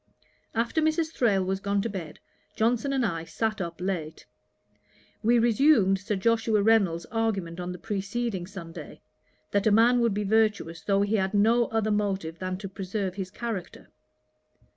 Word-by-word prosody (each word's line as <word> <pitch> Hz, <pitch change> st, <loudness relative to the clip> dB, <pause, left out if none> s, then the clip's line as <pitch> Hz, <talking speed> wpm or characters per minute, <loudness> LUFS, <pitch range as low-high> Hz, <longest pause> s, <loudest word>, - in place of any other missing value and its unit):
After 235 Hz, +8 st, +1 dB
Mrs. 315 Hz, +1 st, +1 dB
Thrale 205 Hz, -6 st, +2 dB
was 190 Hz, +1 st, -1 dB
gone 200 Hz, 0 st, 0 dB
to -, -, -1 dB
bed, 180 Hz, -8 st, -6 dB, 0.4 s
Johnson 240 Hz, +5 st, +1 dB
and 265 Hz, -3 st, +1 dB
I 165 Hz, -5 st, -2 dB
sat 210 Hz, +6 st, -2 dB
up 170 Hz, -2 st, -5 dB
late. 180 Hz, -4 st, -4 dB, 1.0 s
We 235 Hz, +2 st, +4 dB
resumed 230 Hz, -4 st, +4 dB
Sir 205 Hz, +2 st, -2 dB
Joshua 225 Hz, +1 st, +2 dB
Reynolds's 200 Hz, -7 st, +3 dB
argument 200 Hz, -7 st, -1 dB
on 180 Hz, 0 st, -4 dB
the 180 Hz, -, -6 dB
preceding 200 Hz, -1 st, -3 dB
Sunday, 170 Hz, -4 st, -9 dB, 0.5 s
that 200 Hz, +1 st, +1 dB
a -, -, +4 dB
man 235 Hz, +4 st, +5 dB
would 230 Hz, -4 st, +2 dB
be 210 Hz, -, -1 dB
virtuous 205 Hz, -6 st, +1 dB
though 200 Hz, +2 st, +2 dB
he 210 Hz, +2 st, +1 dB
had 190 Hz, +1 st, -1 dB
no 230 Hz, +4 st, +4 dB
other 220 Hz, -1 st, 0 dB
motive 195 Hz, -6 st, -1 dB
than 185 Hz, 0 st, -3 dB
to 195 Hz, +1 st, -6 dB
preserve 195 Hz, 0 st, -4 dB
his 190 Hz, -1 st, -5 dB
character. 215 Hz, -3 st, -6 dB
205 Hz, 165 wpm, -27 LUFS, 185-225 Hz, 1.0 s, man